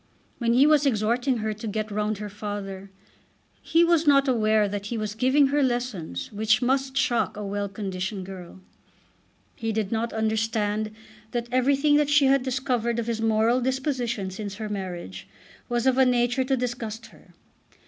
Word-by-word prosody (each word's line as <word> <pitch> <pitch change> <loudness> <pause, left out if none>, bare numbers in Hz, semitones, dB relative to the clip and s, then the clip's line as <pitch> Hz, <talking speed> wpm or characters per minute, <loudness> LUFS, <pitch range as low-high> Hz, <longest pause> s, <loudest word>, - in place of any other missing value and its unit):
When 235 -1 +1
he 260 +4 +6
was 300 -1 +4
exhorting 240 +2 +1
her 215 - 0
to 215 +2 -7
"get 215 0 -3
round 210 0 -1
her 210 +1 -5
father" 200 -1 -6 0.7
he 330 +1 +3
was 335 -2 +3
not 275 -1 +5
aware 215 -4 +3
that 205 0 -4
he 235 - -3
was 215 -1 -3
giving 260 +5 +3
her 290 +1 +2
lessons 240 - -2
which 215 +1 +2
must 265 +1 0
shock 260 -6 +1
a 210 - -5
well 200 0 -3
conditioned 190 -1 -4
girl. 185 -1 -10 0.9
He 225 -1 -3
did 215 -2 -2
not 230 +1 -1
understand 220 -1 -1 0.4
that 240 0 -2
everything 275 +3 +3
that 295 -1 +2
she 290 -1 +5
had 270 0 +4
discovered 250 -3 -1
of 235 - -1
his 230 -1 -2
moral 225 +3 +2
disposition 250 -6 -2
since 200 +1 -6
her 215 0 -5
marriage 175 - -6 0.4
was 240 0 0
of 260 0 +3
a 265 - +6
nature 245 +1 +2
to 265 0 +1
disgust 235 -2 -4
her. - - -20
225 Hz, 170 wpm, -25 LUFS, 210-260 Hz, 0.9 s, he